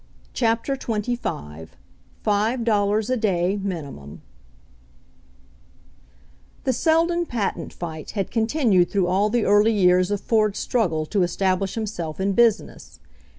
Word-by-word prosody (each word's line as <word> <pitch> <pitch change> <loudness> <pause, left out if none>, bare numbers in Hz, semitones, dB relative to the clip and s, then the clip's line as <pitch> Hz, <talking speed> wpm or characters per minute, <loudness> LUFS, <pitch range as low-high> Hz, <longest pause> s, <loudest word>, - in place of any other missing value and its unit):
CHAPTER 230 +3 0
XXV 210 - -4 0.6
FIVE 220 +4 +1
DOLLARS 210 0 +1
A 255 - +1
DAY 195 -2 0
MINIMUM 145 - -7 2.4
The 260 - +1
Seldon 335 +5 +1
patent 200 - -3
fight 160 -3 -7
had 195 - -2
continued 225 - +2
through 195 -3 +1
all 190 +4 +1
the 235 0 0
early 205 +2 +4
years 180 -2 +3
of 205 -1 -1
Ford's 215 -2 +1
struggle 165 -10 0
to 200 +5 -1
establish 185 +2 0
himself 195 -8 -4
in 195 +1 0
business. 230 0 0
205 Hz, 115 wpm, -23 LUFS, 180-230 Hz, 2.4 s, early